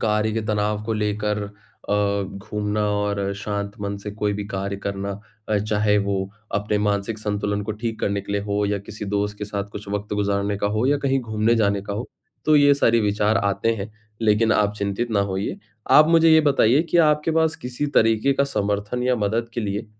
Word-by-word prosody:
कार्य 105 0 +1
के 115 - -1
तनाव 105 0 0
को 115 - -2
लेकर 105 0 -1
अ, 100 0 -2
घूमना 105 +2 -3
और 100 -1 -1
शांत 100 +1 -4
मन 100 0 -3
से 105 +1 -6
कोई 105 0 -1
भी 105 0 -4
कार्य 100 0 -3
करना 100 0 -4 0.4
अ, 105 -1 +2
चाहे 105 0 +1
वो 100 -1 0 0.4
अपने 105 +1 0
मानसिक 105 +1 -1
संतुलन 105 -1 -2
को 110 +1 -3
ठीक 115 +1 -4
करने 100 0 0
के 100 +1 -7
लिए 100 - 0
हो 105 0 +1
या 100 0 0
किसी 105 +1 -8
दोस्त 105 +1 -2
के 105 - -3
साथ 100 -1 -4
कुछ 105 -1 -8
वक़्त 105 +1 -3
गुज़ारने 100 0 0
का 100 - 0
हो 115 - +1
या 145 +1 +2
कहीं 135 -1 +1
घूमने 110 0 +1
जाने 100 -3 +2
का 100 - -5
हो। 110 +5 -4 0.4
तो 155 -1 +5
ये 145 -1 +6
सारी 115 -4 +3
विचार 105 +1 +1
आते 100 +3 +1
हैं 105 +1 -6 0.3
लेकिन 110 +1 +3
आप 105 0 +2
चिंतित 100 +4 -2
ना 100 -2 +2
होइए, 100 0 -2 0.3
आप 155 +1 +8
मुझे 165 -1 +5
ये 160 0 +7
बताइए 140 -1 +4
कि - - +2
आपके 150 0 +3
पास 160 0 +2
किसी 125 +4 -4
तरीके 115 +4 +4
का 140 +1 +2
समर्थन 105 -1 -2
या 125 0 +2
मदद 110 +3 -1
के 120 - -1
लिए 105 +1 -3
105 Hz, 205 wpm, -23 LUFS, 100-115 Hz, 0.4 s, आप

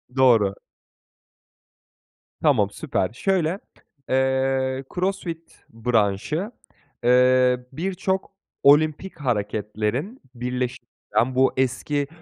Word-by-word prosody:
Doğru. 115 -7 +4 1.9
Tamam, - - +3
süper! 95 +4 -2
Şöyle, 185 - 0 0.5
eee, 130 0 +1
CrossFit 180 -3 -4
branşı, 115 - 0 0.5
eee, 125 0 +4
birçok 190 +5 -2 0.3
olimpik 155 +5 +3
hareketlerin 110 - -2
birleş 125 +1 -2 0.4
den 125 +2 +2
bu 130 +1 +3
eski, 140 +2 0
130 Hz, 75 wpm, -23 LUFS, 120-160 Hz, 1.9 s, Doğru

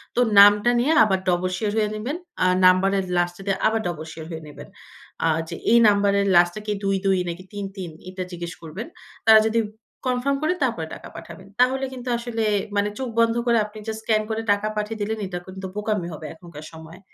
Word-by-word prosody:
তো - - +1 0.2
নামটা 205 +3 +7
নিয়ে 270 +6 +2
আবার 190 -3 +1
ডবল 180 +1 +1
শিওর 215 -2 -1
হয়ে 210 -1 +2
নিবেন। 250 +10 -4 0.3
আ - - +4 0.2
নাম্বারের 190 +1 +4
লাস্টে 175 +1 -1
দিয়ে 195 -1 0
আবার 225 0 +1
ডবল 160 -2 -5
শিওর 160 0 -9
হয়ে 160 - -6
নিবেন। 150 - -11 0.6
আ - - +4 0.2
যে 170 - -5 0.2
এই 235 - +7
নাম্বারের 200 -1 +3
লাস্টে 175 +4 +4
কি 210 - 0
২,২ 195 -1 +1
নাকি 175 +2 -6
৩,৩ 195 -3 -6 0.2
এটা 185 0 -5
জিজ্ঞেস 175 0 -6
করবেন। 170 - -7 0.4
তারা 220 -1 +8
যদি 230 +1 +1 0.5
কনফার্ম 255 +2 0
করে 360 - +2
তারপরে 225 -11 -1
টাকা - - -9
পাঠাবেন। 170 +3 -11
তাহলে 265 +2 +3
কিন্তু 250 0 -6
আসলে 235 -2 -3 0.3
মানে 205 0 +1
চোখ 260 -2 -3
বন্ধ 230 0 +3
করে 235 -1 +3
আপনি 210 +1 -12
জাস্ট 220 0 -4
স্ক্যান 215 -1 +2
করে 220 0 -2
টাকা 205 +1 +1
পাঠিয়ে 210 +1 -3
দিলেন 220 +2 -2
এটা 180 -1 -5
কিন্তু 190 0 -8
বোকামি 210 -4 -2
হবে 155 0 -8
এখনকার 160 -2 -12
সময়। 160 +2 -12
200 Hz, 195 wpm, -23 LUFS, 175-220 Hz, 0.6 s, তারা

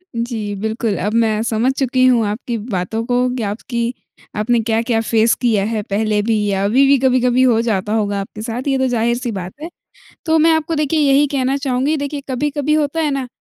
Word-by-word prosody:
जी, 230 -3 -3
बिल्कुल। 220 +1 -2
अब 210 +3 -2
मैं 220 -2 +2
समझ 230 +3 +1
चुकी 255 -1 +2
हूँ 240 -3 +4
आपकी 230 +3 -3
बातों 215 0 -3
को, 250 +1 +1
कि 240 - -3
आपकी 235 +3 -3 0.4
आपने 230 +3 +1
क्या-क्या 225 +1 0
फेस 225 0 +2
किया 225 -5 +1
है, 220 0 -2
पहले 210 +1 0
भी 215 -1 0
या 195 -1 0
अभी 250 +7 +4
भी 280 0 +5
कभी-कभी 250 -1 +2
हो 240 -3 +4
जाता 210 -3 -1
होगा 205 -2 0
आपके 205 +2 -9
साथ, 230 +2 -4
ये 270 -1 +2
तो 260 0 +1
ज़ाहिर-सी 240 0 -1
बात 185 -3 -6
है। 325 - -6 0.6
तो 320 -1 +3
मैं 325 +1 +5
आपको 320 0 0
देखिए 305 +1 0
यही 285 0 +4
कहना 270 -1 0
चाहूँगी 275 +2 0
देखिए, 285 0 -4
कभी-कभी 290 +3 -1
होता 305 +1 0
है 300 -2 0
ना, 270 -2 -2
235 Hz, 200 wpm, -18 LUFS, 220-270 Hz, 0.6 s, भी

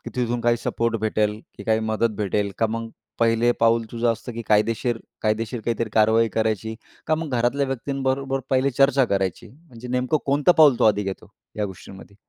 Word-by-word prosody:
तिथून 120 -1 -1
काही 120 0 +2
सपोर्ट 115 0 -1
भेटेल, 105 -1 0 0.2
की 100 - -8
काही 110 +1 +2
मदत 110 0 0
भेटेल, 100 0 -1
का 115 - +2
मग 115 0 -4 0.3
पहिले 115 +1 +3
पाऊल 115 0 +3
तुझं 120 0 +1
असतं 115 +2 -6
की 115 - -5
कायदेशीर 115 +2 +1 0.2
कायदेशीर 110 +2 -1
काहीतरी 115 0 -2
कारवाई 110 +1 +4
करायची, 110 0 -1 0.3
का 155 - +3
मग 160 -1 -4
घरातल्या 130 +4 +1
व्यक्ती 135 +1 -3
बरोबर 135 0 0
पहिले 130 +1 +2
चर्चा 135 +1 +3
करायची? 95 -5 -2
म्हणजे 125 -5 -13
नेमकं 125 +4 0
कोणतं 145 +5 +3
पाऊल 150 -6 +6
तू - - +3
आधी 105 -1 +3
घेतो, 95 -1 -6 0.3
या 105 - 0
गोष्टींमध्ये? 95 +1 -11
115 Hz, 180 wpm, -23 LUFS, 110-125 Hz, 0.3 s, पाऊल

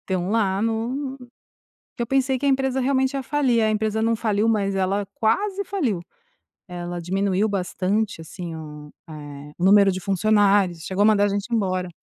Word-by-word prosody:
estão 185 -1 -2
lá 200 -3 +1
no 245 +5 -2 0.8
que - - -2
eu - - -2
pensei 265 +1 +1
que 285 - -6
a - - +4
empresa 265 -1 +1
realmente 265 +1 +1
ia 275 - -2
falir, 255 -5 +1
a 215 - +2
empresa 215 0 0
não 230 +1 +2
faliu, 215 -1 0
mas 200 -3 +1
ela 195 +1 0
quase 395 - 0
faliu, 280 - -1 0.7
ela 175 -1 -5
diminuiu 195 +3 0
bastante, 195 0 -1
assim, 170 +1 -7
o 150 -2 -10 0.2
eh, 145 -1 -9
número 200 +2 +5
de 185 - -4
funcionários, 195 -3 +2
chegou 190 +1 -2
a - - +5
mandar 210 -1 +4
a - - +1
gente 205 +4 -3
embora. 185 -4 0
205 Hz, 175 wpm, -23 LUFS, 185-230 Hz, 0.8 s, número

